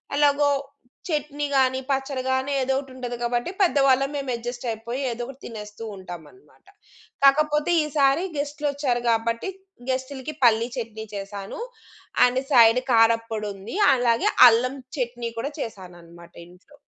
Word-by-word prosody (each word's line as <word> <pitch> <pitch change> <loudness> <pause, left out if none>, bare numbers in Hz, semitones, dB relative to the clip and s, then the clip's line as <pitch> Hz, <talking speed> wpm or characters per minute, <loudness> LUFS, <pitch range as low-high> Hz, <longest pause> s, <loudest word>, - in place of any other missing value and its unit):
ఎలాగో 290 0 +3 0.6
చట్నీ 295 -1 -2
కానీ, 260 0 +3
పచ్చడి 270 -1 -1
కాని 260 +2 0
ఏదో 265 +1 0
ఒకటుంటది 255 -3 -7
కాబట్టి 240 +5 -1
పెద్దవాళ్ళం 275 -6 +3
మేము 275 -2 -4
అడ్జస్ట్ 240 +1 -6
అయిపోయి 235 +4 -5
ఏదో 235 +1 -5
ఒకటి 270 +2 -11
తినేస్తూ 210 -1 -8
ఉంటామన్నమాట. 185 - -12 0.6
కాకపోతే 300 +3 +4
ఈసారి 290 +2 +2
గెస్ట్‌లొచ్చారు 285 -4 -1
కాబట్టి 230 +8 0 0.4
గెస్ట్‌లకి 260 +2 -3
పల్లి 230 0 +4
చట్నీ 220 -2 -5
చేశాను. 200 - -7 0.7
And 250 +1 +1
side 235 0 +6
కారప్పొడుంది. 225 - +1 0.2
అలాగే 235 -2 +2 0.2
అల్లం 250 +4 +1 0.2
చట్నీ 240 -2 -3
కూడా 280 +6 -3
చేశానన్నమాట 175 -6 -9
ఇంట్లో. 180 +11 -20
250 Hz, 115 wpm, -24 LUFS, 225-275 Hz, 0.7 s, side